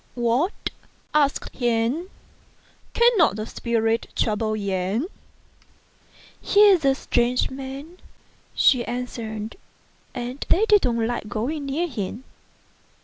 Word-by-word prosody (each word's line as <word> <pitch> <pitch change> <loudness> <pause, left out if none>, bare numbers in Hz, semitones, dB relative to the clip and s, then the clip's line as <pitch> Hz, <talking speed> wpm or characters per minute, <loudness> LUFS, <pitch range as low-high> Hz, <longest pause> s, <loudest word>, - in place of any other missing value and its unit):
" - - -35
What! 245 - 0 0.2
" - - -37
asked 280 - -8
he, 240 +6 0 0.4
" - - -33
cannot 470 - +4
the 215 0 -4
spirits 225 -1 -1
trouble 215 0 0
Yen? 200 - -1 0.4
" - - -34
" - - -33 0.3
He 410 +1 +5
is 365 -5 +4
a 270 -1 +4
strange 245 -1 +1
man," 275 +6 -8 0.6
she 250 -3 +4
answered, 225 - -5 0.6
"and 250 +2 -4
they 415 +5 +4
don't 245 - +3
like 235 -2 -3
going 275 +6 -3
near 315 +6 -1
him." 225 - -5
245 Hz, 125 wpm, -24 LUFS, 225-290 Hz, 0.6 s, He